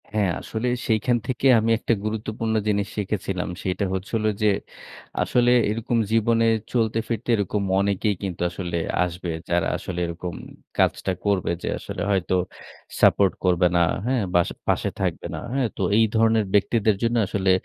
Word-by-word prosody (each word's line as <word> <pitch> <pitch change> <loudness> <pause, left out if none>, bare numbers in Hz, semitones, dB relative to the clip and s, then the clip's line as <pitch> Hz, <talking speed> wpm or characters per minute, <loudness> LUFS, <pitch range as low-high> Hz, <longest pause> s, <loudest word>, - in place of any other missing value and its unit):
হ্যাঁ, 105 -4 +2
আসলে 115 +2 -3 0.2
সেইখান 115 +2 +2
থেকে 130 +1 +1
আমি 115 +1 +1
একটা 115 - +1
গুরুত্বপূর্ণ 110 +1 -2
জিনিস 100 -1 +1
শিখেছিলাম। 95 -3 -2
সেটা 95 +2 -1
হচ্ছিল 100 +4 -2 0.2
যে 105 - +4 0.7
আসলে 120 0 +3 0.2
এরকম 115 +2 -1
জীবনে 115 +1 +3 0.3
চলতে 115 -2 +1
ফিরতে 115 +1 -4
এরকম 100 0 -1 0.2
অনেকেই 100 +1 +1
কিন্তু 95 -4 -4
আসলে 85 -1 -4 0.3
আসবে। 90 0 -4 0.2
যারা 85 0 +2
আসলে 90 -1 -5
এরকম 85 +1 -5 0.4
কাজটা - - +1
করবে 100 -4 +1
যে - - -3
আসলে - - -6
হয়তো 95 -1 +1 0.7
সাপোর্ট 100 -2 +5
করবে 90 -1 +4
না, - - +4 0.2
হ্যাঁ? 125 -3 +1
বা 85 - +5 0.3
পাশে - - +1
থাকবে - - -2
না। - - -4
হ্যাঁ? 135 -3 +1
তো - - -4 0.2
এই 115 - +6
ধরনের 110 -1 +3
ব্যক্তিদের 105 +1 +3
জন্য 115 +1 +1
আসলে 95 -1 +1
105 Hz, 155 wpm, -24 LUFS, 95-115 Hz, 0.7 s, এই